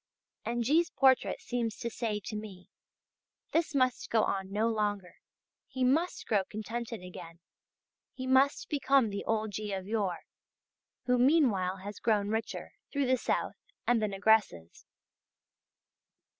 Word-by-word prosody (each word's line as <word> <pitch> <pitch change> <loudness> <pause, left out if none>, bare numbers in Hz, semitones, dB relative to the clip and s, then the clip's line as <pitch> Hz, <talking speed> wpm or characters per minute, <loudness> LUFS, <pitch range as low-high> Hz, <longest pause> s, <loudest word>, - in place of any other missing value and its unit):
And 240 +1 -1
G's. 320 +8 +3
portrait 265 -2 +3
seems 235 -3 -2
to - - -4
say 220 -2 -2
to 215 +3 -6
me: 205 -4 -8 0.8
this 325 -2 0
must 255 -2 +1
go 225 -1 +3
on 190 -1 -2
no 215 +3 +1
longer, 205 -5 -2 0.5
he 260 - -3
must 310 +8 +1
grow 205 -3 +2
contented 220 +1 -5
again, 175 -2 -10 0.7
he 260 - -7
must 265 +2 +3
become 270 -5 +2
the 200 - -4
old 220 -1 0
G. 210 +1 -4
of 190 -1 -4
yore, 200 -4 -1 0.8
who 250 0 +2
meanwhile 240 - +3
has 205 +1 -7
grown 205 -3 +1
richer, 220 +1 -3 0.2
through 280 -1 0
the 255 - +1
south{JJ} - - -1 0.3
and 240 -2 +3
the 215 - +1
negresses. 195 - +1
220 Hz, 140 wpm, -31 LUFS, 200-255 Hz, 0.8 s, G's